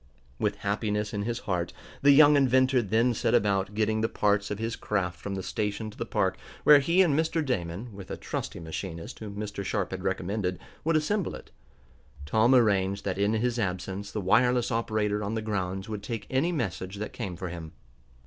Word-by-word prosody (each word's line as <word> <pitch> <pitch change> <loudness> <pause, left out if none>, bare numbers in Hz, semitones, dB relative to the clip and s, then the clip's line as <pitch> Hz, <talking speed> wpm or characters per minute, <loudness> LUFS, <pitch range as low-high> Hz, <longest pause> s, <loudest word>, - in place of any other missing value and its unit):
With 105 -1 0
happiness 105 +1 -1
in 105 - -1
his 120 +1 -2
heart, 90 -4 -2 0.3
the 145 - +5
young 145 +1 +8
inventor 130 -1 +4
then 115 +4 +2
set 115 +1 +1
about 100 -2 +1
getting 110 0 +1
the 115 - +1
parts 100 -1 +1
of 105 - -3
his 115 +1 -2
craft 90 -5 -2
from 100 +4 -4
the 95 - -4
station 105 +1 -3
to - - -16
the - - -3
park, - - 0 0.2
where 150 -1 +8
he 170 +7 +4
and 165 -6 +2
Mr. 160 +1 +1
Damon, 100 -1 -3
with 95 -1 -10
a - - -4
trusty - - -5
machinist 80 +1 -6
whom 105 -2 -7
Mr. 105 -1 -4
Sharp 100 0 -1
had 95 -1 -5
recommended, 95 0 -1 0.3
would 165 +1 +2
assemble 175 +5 0
it. - - -12 0.7
Tom 110 - +4
arranged 100 -4 +2
that 95 -1 -2
in 100 +2 +2
his 120 +2 0
absence 95 0 -3
the 105 - -3
wireless 120 +5 +3
operator 110 -2 0
on 105 +3 -2
the - - 0
grounds 95 -3 -2
would 105 -2 -4
take 115 0 -5
any 135 +7 +2
message 95 - -3
that 105 +1 -5
came 100 -7 -4
for 90 +1 -5
him. 85 -2 -8
105 Hz, 195 wpm, -28 LUFS, 95-120 Hz, 0.7 s, young